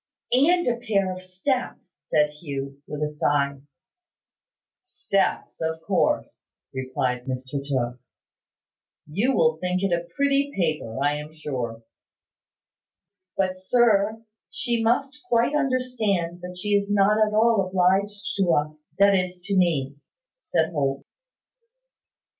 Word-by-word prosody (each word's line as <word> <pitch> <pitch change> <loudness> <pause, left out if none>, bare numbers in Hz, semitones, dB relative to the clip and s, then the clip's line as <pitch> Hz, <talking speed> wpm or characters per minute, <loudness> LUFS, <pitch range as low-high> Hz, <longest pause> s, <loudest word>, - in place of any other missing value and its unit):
"And 345 +8 +4
a 240 -1 +1
pair 195 -5 +1
of 185 - -9
steps," 185 +2 -3
said 150 -2 +2
Hugh, 140 -2 -6
with 150 0 -4
a 150 - 0
sigh. 140 -2 0 1.2
"Steps, 200 - -2
of 160 0 -1
course," - - -1 0.2
replied 130 -1 -2
Mr 130 +1 -4
Tooke. 125 -3 -2 1.1
"You 205 - 0
will 475 0 +3
think 180 +1 -1
it 195 -3 +1
a 170 0 -1
pretty 280 0 +2
paper, 155 -10 -1
I 145 +1 +2
am 150 +1 -8
sure." 120 -7 -4 1.5
"But, 185 -1 +1
sir, 220 +2 +2 0.3
she 235 -1 -1
must 270 +5 +1
quite 235 +4 +3
understand 230 - 0
that 180 0 -8
she 210 - -3
is 200 0 +2
not 205 +2 +4
at 210 0 0
all 220 -3 +4
obliged 195 +2 +1
to 185 -4 +3
us, 150 +1 -2
that 200 0 +6
is, 180 -1 0
to 200 +2 -2
me," 145 -7 +1 0.4
said - - 0
Holt. 140 -3 -1
185 Hz, 125 wpm, -25 LUFS, 150-220 Hz, 1.5 s, that